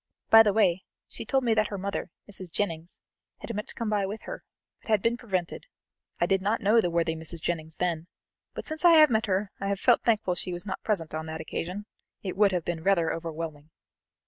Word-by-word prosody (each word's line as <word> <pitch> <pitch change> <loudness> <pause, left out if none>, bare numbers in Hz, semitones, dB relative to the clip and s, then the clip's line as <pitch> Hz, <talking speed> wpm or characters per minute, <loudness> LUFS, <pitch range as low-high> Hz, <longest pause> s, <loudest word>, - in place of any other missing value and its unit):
By 225 - +11
the 210 -2 +4
way, 190 -4 +2 0.2
she - - -9
told 270 -1 +1
me 235 -2 +3
that 215 -1 +2
her 200 - -5
mother, 200 +1 -3 0.2
Mrs. 190 -4 -6
Jennings, 165 -3 -3 0.4
had - - -6
meant 210 +1 -4
to - - -9
come 230 -2 -2
by 205 -2 +1
with 210 +3 -6
her, - - -7 0.4
but - - -16
had 215 -1 +4
been 230 +1 +2
prevented; 195 - -3 0.5
I - - +3
did 195 -2 +1
not 210 +4 +1
know 220 +2 +4
the 175 - 0
worthy 165 -1 +1
Mrs. 160 +1 -5
Jennings 160 -1 -3
then, 170 -2 -2 0.5
but - - -5
since 315 +1 -5
I 345 -1 +8
have 310 -4 +7
met 220 0 +1
her 195 +1 0
I 195 - -3
have 200 -1 -1
felt 245 +2 +4
thankful 215 -5 +1
she 180 +1 -4
was 175 +3 -1
not 190 -2 -4
present 170 -8 -1
on 160 0 -4
that 160 0 -5
occasion; 180 +5 -5 0.4
it 185 -2 -4
would 200 0 +4
have 180 -3 -1
been 170 -2 -3
rather 170 -3 +2
overwhelming." 160 -2 -6
195 Hz, 225 wpm, -27 LUFS, 170-215 Hz, 0.5 s, By